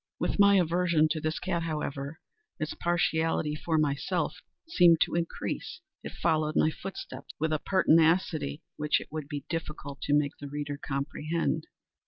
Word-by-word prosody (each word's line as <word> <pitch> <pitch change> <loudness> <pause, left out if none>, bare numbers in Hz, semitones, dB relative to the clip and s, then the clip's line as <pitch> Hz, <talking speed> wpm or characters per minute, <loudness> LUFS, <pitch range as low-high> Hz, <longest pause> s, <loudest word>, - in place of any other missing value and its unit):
With - - -1
my 200 0 +7
aversion 170 -3 +3
to 155 0 -1
this 155 +1 -1
cat, 175 -2 -1
however, 150 -2 -4 0.4
its 155 -1 -2
partiality 165 -3 +1
for 160 +1 -1
myself 145 -2 0 0.3
seemed 175 - +5
to - - +2
increase. 170 - -3 0.2
It - - -6
followed 155 -1 0
my 155 - +4
footsteps 195 +4 -8
with 160 +1 +1
a 155 - +1
pertinacity 165 -4 +2
which 150 0 +2
it - - -10
would 155 -2 -5
be 145 -2 -5
difficult 150 -4 -5
to 145 - +2
make 145 -1 0
the 145 - -7
reader 145 0 -4
comprehend. 155 +3 -2
155 Hz, 155 wpm, -29 LUFS, 150-170 Hz, 0.4 s, my